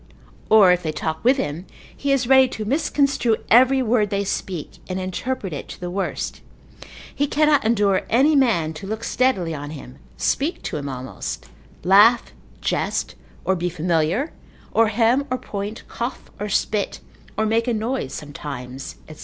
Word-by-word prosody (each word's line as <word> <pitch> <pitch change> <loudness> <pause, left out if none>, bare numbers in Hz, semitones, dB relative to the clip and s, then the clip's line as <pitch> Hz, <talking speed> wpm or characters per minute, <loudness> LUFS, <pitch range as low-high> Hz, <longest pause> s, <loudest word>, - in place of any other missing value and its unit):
Or 210 -4 +7
if 180 0 +2
they 160 -3 -2
talk 160 +1 -4
with 255 +4 +4
him, 165 - -3 0.3
he 280 - -1
is 270 -2 +2
ready 265 +1 +6
to 215 -3 -5
misconstrue 275 -2 +1 0.2
every 260 +3 +6
word 220 -3 +2
they 200 0 0
speak, 185 -4 -4
and 185 0 -2
interpret 190 +2 -3
it 145 - -6
to - - -9
the 180 0 -5
worst; 195 +1 -3 0.7
he 290 - 0
cannot 300 0 +3
endure 205 -4 +2
any 280 +6 +4
man 210 - +2
to 160 +5 -8
look 220 +2 -4
steadily 230 -13 +1
on 145 -1 -6
him, 140 -4 -10 0.2
speak 300 +6 -1
to - - -3
him 140 -1 -4
almost, 130 - -6 0.4
laugh, 210 +6 +5 0.3
jest, - - -1 0.3
or 190 - +2
be 180 0 -1
familiar, 175 - 0 0.4
or 225 0 +4
hem, 235 +6 +2
or 255 - 0
point, 205 -1 -6
cough, 240 +3 -5
or 210 +1 -3
spit, 205 +1 0 0.4
or 220 - +2
make 225 +2 +1
a - - +2
noise 220 - -2
sometimes, 135 -3 -7
&c. 155 - -11
210 Hz, 165 wpm, -22 LUFS, 170-255 Hz, 0.7 s, Or